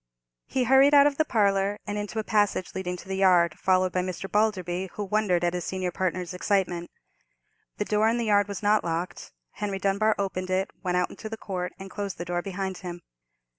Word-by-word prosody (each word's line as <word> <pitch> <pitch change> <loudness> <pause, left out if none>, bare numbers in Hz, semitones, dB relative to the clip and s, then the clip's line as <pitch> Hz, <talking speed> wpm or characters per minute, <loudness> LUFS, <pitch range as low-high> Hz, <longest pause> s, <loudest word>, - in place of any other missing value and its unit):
He 260 - 0
hurried 270 +3 +6
out 285 0 +8
of 290 -1 +2
the 315 - +4
parlour, 200 -4 +2
and 205 - -3
into 210 +1 -4
a 220 - 0
passage 205 -4 +1
leading 180 -1 -3
to - - -12
the 190 0 -3
yard, 180 -4 +4
followed 185 -1 +2
by 180 - 0
Mr. 185 +1 -4
Balderby, 190 -4 0
who 210 - -4
wondered 200 -3 +1
at 175 0 +1
his 180 -1 -2
senior 185 0 -2
partner's 180 -1 -2
excitement. 180 -2 0 0.9
The 210 - -1
door 215 +1 +2
in 230 - +1
the 235 - -1
yard 205 -1 +3
was 200 +1 -6
not 210 +1 +3
locked. 170 +2 -4 0.2
Henry 205 -2 -3
Dunbar 200 +3 +2
opened 185 -2 -3
it, 190 +1 0
went 180 -2 0
out 180 - 0
into 220 - -8
the 225 - -5
court, 180 -4 -4
and 195 0 -9
closed 200 -2 -4
the 175 - -5
door 175 0 -1
behind 190 0 -4
him. 175 -2 -7
195 Hz, 210 wpm, -26 LUFS, 180-210 Hz, 0.9 s, out